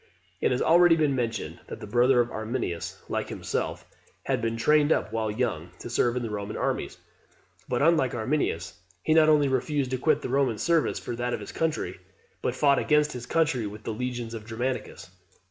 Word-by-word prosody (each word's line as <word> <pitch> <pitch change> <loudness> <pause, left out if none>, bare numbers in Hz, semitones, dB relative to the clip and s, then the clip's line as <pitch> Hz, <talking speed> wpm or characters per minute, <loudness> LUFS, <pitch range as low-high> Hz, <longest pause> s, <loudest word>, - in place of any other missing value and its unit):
It - - +3
has 125 - 0
been - - +1
already 170 0 +6
mentioned 135 -7 -1
that - - -7
the - - -7
brother 120 +3 +4
of 120 - -2
Arminius, 110 -6 -3
like - - -2
himself, - - -3 0.4
had - - 0
been 115 0 -1
trained 150 +5 +3
up, 110 - +1
while 110 -1 0
young, 105 -7 -2
to 120 - -8
serve 120 0 +2
in 125 - -1
the 115 - -3
Roman 105 0 -4
armies; - - -2 0.7
but, 125 +2 +1
unlike 150 -6 +3
Arminius, 110 - -1 0.2
he 155 - +3
not 155 -1 +6
only 150 -2 +5
refused 135 0 0
to 130 - -1
quit 155 - +2
the - - -3
Roman 130 -4 +1
service 170 +3 +1
for 120 - -5
that 120 0 -1
of - - -7
his - - -8
country, 155 - -2 0.4
but 125 - -1
fought 140 0 +4
against 150 0 +3
his 120 -1 -7
country 140 -9 +1
with 105 +1 -9
the 115 - -3
legions 120 0 -4
of 110 -2 -6
Germanicus. 120 -7 -4
125 Hz, 195 wpm, -27 LUFS, 115-150 Hz, 0.7 s, already